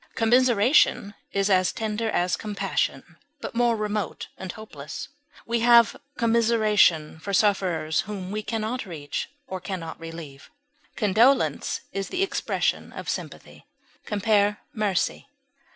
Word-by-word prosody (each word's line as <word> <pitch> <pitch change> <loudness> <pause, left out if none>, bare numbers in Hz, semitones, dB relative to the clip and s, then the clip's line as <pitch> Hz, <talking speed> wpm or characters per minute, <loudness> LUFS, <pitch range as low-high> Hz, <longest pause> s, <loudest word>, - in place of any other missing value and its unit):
Commiseration 235 -2 +3 0.2
is 195 0 +1
as 185 -3 +3
tender 220 0 -2
as 180 -3 +1
compassion, 210 -2 -3 0.2
but - - -6
more 240 0 +2
remote 210 -1 -3
and 190 -1 -6
hopeless; 150 -10 -8 0.4
we 235 0 0
have 235 -1 +6 0.2
commiseration 215 -9 +3
for 200 +5 -5
sufferers 180 -6 +2
whom 195 -3 -5
we 215 +1 -2
can 225 +1 -3
not 225 +1 -3
reach 145 -5 -5 0.2
or 190 -6 -5
can 185 0 -4
not 165 -1 -8
relieve. 165 -4 -9 0.5
Condolence 225 +6 +2
is 195 0 -3
the 370 +1 0
expression 390 - -1
of - - -6
sympathy. - - -6 0.4
Compare 205 -1 +2 0.2
MERCY. 210 0 -1
210 Hz, 125 wpm, -25 LUFS, 185-225 Hz, 0.5 s, have